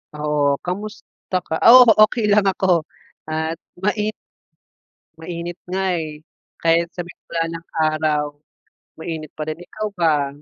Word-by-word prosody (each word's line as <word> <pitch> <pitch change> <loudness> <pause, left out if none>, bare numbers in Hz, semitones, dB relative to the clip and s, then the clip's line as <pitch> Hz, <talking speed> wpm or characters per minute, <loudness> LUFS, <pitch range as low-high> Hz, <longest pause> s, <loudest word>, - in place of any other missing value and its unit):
Oo, 150 -1 +1
kamusta 205 +1 -5
ka 160 - -1 0.2
oo, 255 +1 +11 0.2
okey 215 -3 -1
lang 205 -1 +4
ako 185 -4 +2 0.4
at 160 +1 -2 0.2
mai 210 +1 +1 1.1
Mainit 170 +1 -6
nga, 190 +1 -1 0.2
eh. 155 -2 -6 0.4
Kahit 170 +1 +2
sabihing 175 -1 -9
wala 165 -1 0
ng 165 0 -7 0.2
araw, 155 -1 0 0.8
mainit 160 -2 -6
pa 155 0 -6
rin. 155 - -3
Ikaw 215 +4 -5
ba? 155 -5 +2
165 Hz, 125 wpm, -21 LUFS, 155-190 Hz, 1.1 s, oo